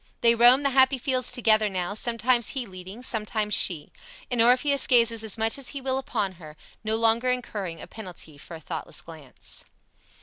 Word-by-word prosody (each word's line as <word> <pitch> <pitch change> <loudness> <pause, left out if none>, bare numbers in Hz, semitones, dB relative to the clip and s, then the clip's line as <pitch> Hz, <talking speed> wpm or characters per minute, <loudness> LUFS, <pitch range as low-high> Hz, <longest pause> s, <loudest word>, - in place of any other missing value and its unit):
They 230 0 +5
roam 245 +4 +5
the 275 - +1
happy 265 +1 +4
fields 255 0 -1
together 220 -4 +2
now, 185 0 -3
sometimes 235 +1 +1
he 255 - -2
leading, 190 +4 -11
sometimes 215 -2 -2
she; 155 -6 +3 0.4
and 245 -2 +1
Orpheus 255 +4 +3
gazes 230 -2 +3
as 220 0 -3
much 225 +4 -1
as 270 - -4
he - - -4
will 265 0 -2
upon 215 -7 -3
her, 155 -1 -12 0.3
no 220 0 0
longer 230 +2 +2
incurring 205 -9 -3
a - - -9
penalty 175 -8 -10
for 165 - -10
a - - -10
thoughtless 160 +1 -6
glance. 155 -6 -11
225 Hz, 180 wpm, -25 LUFS, 190-250 Hz, 0.4 s, They